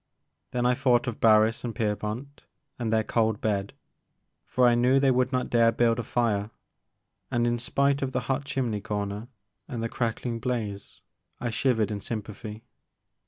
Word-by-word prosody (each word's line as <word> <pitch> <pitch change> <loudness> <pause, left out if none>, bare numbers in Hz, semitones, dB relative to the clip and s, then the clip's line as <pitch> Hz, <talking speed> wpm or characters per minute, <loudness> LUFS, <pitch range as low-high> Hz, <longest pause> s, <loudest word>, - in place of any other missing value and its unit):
Then 120 0 -1
I 125 - +4
thought 125 -2 +2
of 120 - -4
Barris 110 0 +4
and 120 -2 -4
Pierpont, 110 +5 -3 0.4
and 115 -2 -1
their 110 0 +3
cold 110 -1 +1
bed, 100 -2 -1 0.8
for 125 -1 +3
I 120 - +5
knew 125 +3 +4
they 135 -1 +4
would 130 +1 +2
not 125 -1 -1
dare 115 -1 +5
build 115 0 +2
a - - -2
fire, 110 -3 0 0.8
and, 120 0 +1
in 120 0 +1
spite 140 +3 +1
of 135 -1 -1
the - - -1
hot 135 +1 -1
chimney 130 -7 -2
comer 105 +2 -3 0.4
and 115 -3 -4
the 115 - -1
crackling 115 0 -2
blaze, 110 -5 -4 0.4
I 120 - -2
shivered 110 -3 +1
in 100 -1 -4
sympathy. 110 0 -6
115 Hz, 165 wpm, -27 LUFS, 110-125 Hz, 0.8 s, I